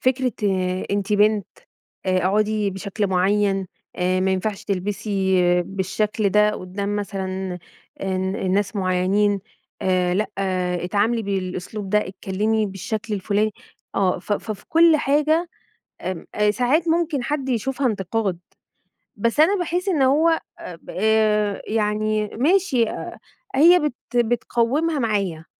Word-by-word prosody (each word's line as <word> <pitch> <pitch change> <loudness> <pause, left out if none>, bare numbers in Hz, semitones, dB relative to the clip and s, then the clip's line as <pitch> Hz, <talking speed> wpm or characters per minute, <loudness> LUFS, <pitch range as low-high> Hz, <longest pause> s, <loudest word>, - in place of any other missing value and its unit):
فكرة 255 -1 +1 0.6
أنتِ 200 +1 -1
بنت، 210 -1 +3 0.6
آآ 185 0 +2
أقعُدي 210 +2 +1
بشكل 200 +2 -3
معيّن 195 +1 +1 0.3
آآ 185 +1 +1
ما 190 +1 +1
ينفعش 200 +3 -2
تلبسي 195 0 -1 0.3
بالشكل 200 +3 -1
ده 210 +2 +4
قُدّام 200 +1 -4
مثلًا 190 -2 -4 0.4
الن 190 0 -1
الناس 200 +2 0
معيّنين، 195 +2 +1 0.4
آآ 180 -1 +1
لأ 210 +3 +1 0.6
اتعاملي 215 +5 +1
بالأسلوب 195 0 -4
ده، 210 - +4
اتكلّمي 210 +3 -1
بالشكل 210 +3 -4
الفُلاني 205 +2 0 0.4
آه. 190 -2 +1
ف 190 - -4
ف 215 - -3
في 205 - -13
كل 330 -1 +6
حاجة 305 +4 +2 0.5
آمم، 185 -3 -4
أ 210 0 +3
ساعات 260 +9 +1
ممكن 325 -5 +1
حد 275 0 -2
يشوفها 260 +3 0
انتقاد. 195 -3 -1 0.8
بس 230 +6 -1
أنا 360 +7 +5
باحس 355 +1 -2
إن 320 -7 +1
هو 315 +5 +4 0.2
أ 180 - -8
ب 165 - -18 0.8
يعني 215 0 0
ماشي 265 - +2
أ - - -6 0.4
هي 340 +6 +7
بت 295 -5 -1 0.2
بتقوّمها 240 +6 +1
معايا 195 -9 -1
210 Hz, 125 wpm, -22 LUFS, 190-245 Hz, 0.8 s, هي